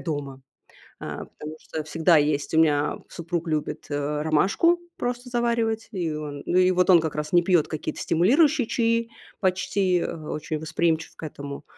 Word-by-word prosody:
дома. 140 Hz, -4 st, -4 dB, 0.6 s
А, -, -, -6 dB
потому 155 Hz, +1 st, -9 dB
что 155 Hz, -1 st, -6 dB
всегда 165 Hz, +2 st, +3 dB
есть 145 Hz, -1 st, 0 dB
у -, -, +4 dB
меня 150 Hz, -2 st, +2 dB
супруг 170 Hz, 0 st, -4 dB
любит, 155 Hz, 0 st, -2 dB
э, 145 Hz, +1 st, -1 dB
ромашку 195 Hz, -, +3 dB, 0.2 s
просто 245 Hz, +1 st, -3 dB
заваривать. 235 Hz, -2 st, 0 dB
И 170 Hz, -5 st, -2 dB
он 150 Hz, -2 st, -6 dB
ну, 180 Hz, -, +2 dB
и 185 Hz, 0 st, +5 dB
вот 180 Hz, +1 st, +3 dB
он 175 Hz, -, +8 dB
как 160 Hz, -2 st, -3 dB
раз 150 Hz, 0 st, -4 dB
не 175 Hz, -1 st, +5 dB
пьёт 175 Hz, -3 st, +2 dB
какие-то 155 Hz, -, -4 dB
стимулирующие 265 Hz, -, +3 dB
чаи, 230 Hz, 0 st, +1 dB, 0.3 s
почти, 185 Hz, -1 st, +1 dB
э, -, -, -2 dB
очень 155 Hz, 0 st, -4 dB
восприимчив 160 Hz, +1 st, -1 dB
к -, -, -14 dB
этому. 140 Hz, -2 st, -7 dB
165 Hz, 170 wpm, -25 LUFS, 150-195 Hz, 0.6 s, он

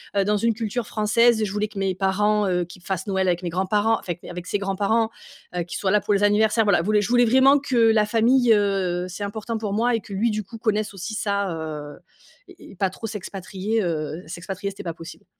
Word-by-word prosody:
heu, 200 Hz, -, +3 dB
dans 210 Hz, +1 st, +2 dB
une 230 Hz, +2 st, +1 dB
culture 225 Hz, +1 st, -3 dB
française. 220 Hz, +2 st, +3 dB
Je 200 Hz, -, -2 dB
voulais 210 Hz, +1 st, -1 dB
que 195 Hz, -, -7 dB
mes 190 Hz, -1 st, 0 dB
parents, 205 Hz, +2 st, +1 dB
heu, 180 Hz, -1 st, 0 dB
qu'il 175 Hz, +1 st, -14 dB
fasse 190 Hz, 0 st, -3 dB
Noël 190 Hz, -1 st, 0 dB
avec 175 Hz, -1 st, +1 dB
mes 175 Hz, -, -2 dB
grands-parents, 205 Hz, +5 st, +1 dB
enfin, 175 Hz, -, -4 dB
mes -, -, -11 dB
avec 175 Hz, 0 st, -7 dB
ses 205 Hz, -, -1 dB
grands-parents, 200 Hz, +3 st, +1 dB, 0.5 s
heu, 175 Hz, -, 0 dB
qu'il 175 Hz, -, -6 dB
soit 190 Hz, -, 0 dB
là 210 Hz, -, +3 dB
pour 205 Hz, -, 0 dB
les 200 Hz, -, +1 dB
anniversaires, 215 Hz, +2 st, +3 dB
voilà, 175 Hz, -5 st, +3 dB
voulais 210 Hz, +2 st, +2 dB
je 205 Hz, -, -2 dB
voulais 245 Hz, 0 st, +5 dB
vraiment 265 Hz, +4 st, +5 dB
que 265 Hz, -3 st, -2 dB
la 225 Hz, -2 st, +5 dB
famille, 230 Hz, +2 st, +4 dB
heu, 190 Hz, -3 st, 0 dB
c'est 200 Hz, +3 st, -6 dB
important 220 Hz, +3 st, -4 dB
pour 210 Hz, -2 st, -3 dB
moi 235 Hz, +3 st, +2 dB
et 225 Hz, -, -2 dB
que 200 Hz, -, -10 dB
lui, 220 Hz, +5 st, +1 dB
du 215 Hz, 0 st, -2 dB
coup, 225 Hz, +4 st, -11 dB
connaisse 215 Hz, -2 st, 0 dB
aussi 195 Hz, +3 st, -6 dB
ça, 200 Hz, -3 st, -1 dB
heu 160 Hz, -, -5 dB, 0.9 s
et -, -, -14 dB
et -, -, -14 dB
pas 190 Hz, +1 st, 0 dB
trop 225 Hz, +4 st, -7 dB
s'expatrier, 200 Hz, +1 st, -3 dB
heu, 160 Hz, -1 st, -3 dB
s'expatrier, 185 Hz, +3 st, -5 dB
c'était 200 Hz, -, -10 dB
pas 170 Hz, -3 st, -4 dB
possible. 165 Hz, 0 st, -11 dB
205 Hz, 240 wpm, -23 LUFS, 190-220 Hz, 0.9 s, voulais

